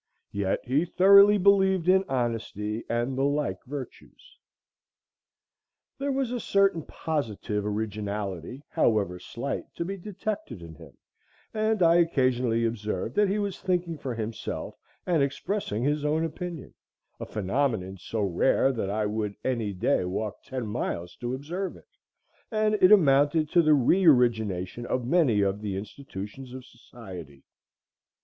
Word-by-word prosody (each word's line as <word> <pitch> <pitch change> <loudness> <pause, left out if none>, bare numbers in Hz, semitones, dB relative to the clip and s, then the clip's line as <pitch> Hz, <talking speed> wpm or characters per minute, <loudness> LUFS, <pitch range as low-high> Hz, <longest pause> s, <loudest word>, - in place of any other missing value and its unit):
Yet 100 -1 -1
he 135 +6 +1
thoroughly 200 +3 +7
believed 190 -2 +3
in 190 +1 +5
honesty 115 -3 -2
and 120 +3 -1
the 135 - -1
like 145 +1 -1
virtues. 145 - -9 1.6
There 280 +1 -1
was 265 -3 -1
a 250 - -2
certain 195 -6 +2
positive 110 -10 -3
originality, 105 - -4
however 100 -5 +1
slight, 125 +8 -5
to 170 - -3
be 195 +2 -4
detected 195 - -5
in 80 -1 -10
him, 75 - -15 0.6
and 215 -2 +1
I 165 0 +6
occasionally 130 -8 +2
observed 110 -1 -3
that 205 +3 +3
he 200 - 0
was 200 -2 -3
thinking 175 -3 -1
for 130 -4 -4
himself 110 0 -5 0.3
and 170 -5 +2
expressing 140 - -2
his 145 +2 0
own 155 +2 +1
opinion, 170 -1 -6 0.5
a - - -5
phenomenon 105 -2 -1
so 110 +3 -3
rare 100 +8 +2
that 110 -6 -3
I 105 +1 0
would 105 -1 -2
any 115 -5 -1
day 90 -1 +1
walk 95 +3 -4
ten 130 -3 -5
miles 90 -5 -4
to 120 +1 -3
observe 175 +8 -5
it, - - -21 0.6
and 215 -1 +1
it 185 - +7
amounted 150 -4 +4
to 175 - +5
the 155 -2 +5
re 145 +8 +3
origination 110 - +2
of 125 -2 -1
many 130 -8 +3
of 100 +1 0
the 100 -3 -3
institutions 105 +3 -8
of 130 -1 -9
society. 95 - -12
130 Hz, 140 wpm, -27 LUFS, 105-170 Hz, 1.6 s, thoroughly